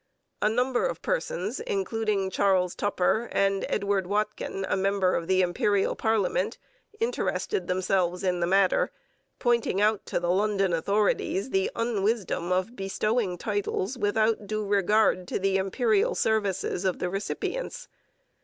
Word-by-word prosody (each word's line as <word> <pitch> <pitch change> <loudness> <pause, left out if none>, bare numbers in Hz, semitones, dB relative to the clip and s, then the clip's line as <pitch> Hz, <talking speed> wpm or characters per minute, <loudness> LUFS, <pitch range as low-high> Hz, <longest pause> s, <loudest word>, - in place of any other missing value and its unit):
A 210 - +3
number 250 - +1
of - - -6
persons, - - -2
including 225 - -1
Charles 185 -2 +2
Tupper 205 +3 0
and 195 0 +1
Edward 200 -2 0
Watkin, 205 -1 -2
a - - +1
member 195 -1 +1
of 165 - -1
the 185 0 +3
Imperial 195 +3 +1
parliament, 225 - 0 0.4
interested 455 -2 -1
themselves 180 -1 0
in 180 -2 +1
the 170 - +1
matter, 190 +1 +3 0.5
pointing 235 -5 +1
out 210 0 +2
to - - -1
the 175 0 0
London 195 -1 +1
authorities 200 +5 0
the 190 0 +1
unwisdom 215 -5 -1
of 185 +6 0
bestowing 195 0 -1
titles 205 +3 -2
without 215 -1 +1
due 215 +1 -2
regard 200 -2 +2
to - - -2
the 195 0 +1
Imperial 200 +2 +1
services 200 -4 0
of 185 -2 0
the - - -2
recipients. 200 - -4
200 Hz, 135 wpm, -27 LUFS, 190-220 Hz, 0.5 s, A